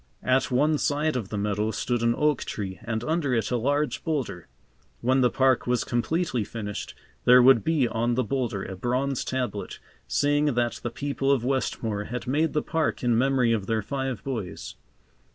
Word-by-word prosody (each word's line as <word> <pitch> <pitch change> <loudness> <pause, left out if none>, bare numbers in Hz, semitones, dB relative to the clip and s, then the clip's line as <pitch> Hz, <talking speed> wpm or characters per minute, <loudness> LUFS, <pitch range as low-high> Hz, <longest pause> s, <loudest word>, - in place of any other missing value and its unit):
At 130 +1 +2
one 145 +4 +2
side 150 +1 0
of 115 -6 -3
the 105 - -4
meadow 105 +1 0
stood 120 +1 -1
an 115 0 +2
oak 150 -3 +2
tree 95 -4 -5
and 115 -1 -3
under 155 -4 0
it 115 - -1
a - - +2
large 140 +3 0
boulder. 140 - -3 0.5
When 130 +2 +3
the 125 - +4
park 130 -1 +2
was 125 0 +1
completely 125 +1 -1
finished 105 -1 -6 0.3
there 125 +1 +8
would 125 -2 +6
be 155 -6 +2
on 115 +1 0
the 130 - +1
boulder 120 -5 -2
a 95 - -6
bronze 125 +6 -1
tablet, 125 -6 -3 0.3
saying 145 -1 +2
that 120 -1 0
the 120 - -3
people 140 +2 -1
of 130 -4 +1
Westmore 115 -5 -1
had 125 +1 -5
made 150 +5 +1
the 150 - 0
park 160 -5 -1
in 120 -2 +3
memory 125 -1 +3
of 100 -4 -2
their 110 -2 0
five 135 -2 -3
boys. 110 -10 -5
125 Hz, 185 wpm, -26 LUFS, 115-140 Hz, 0.5 s, there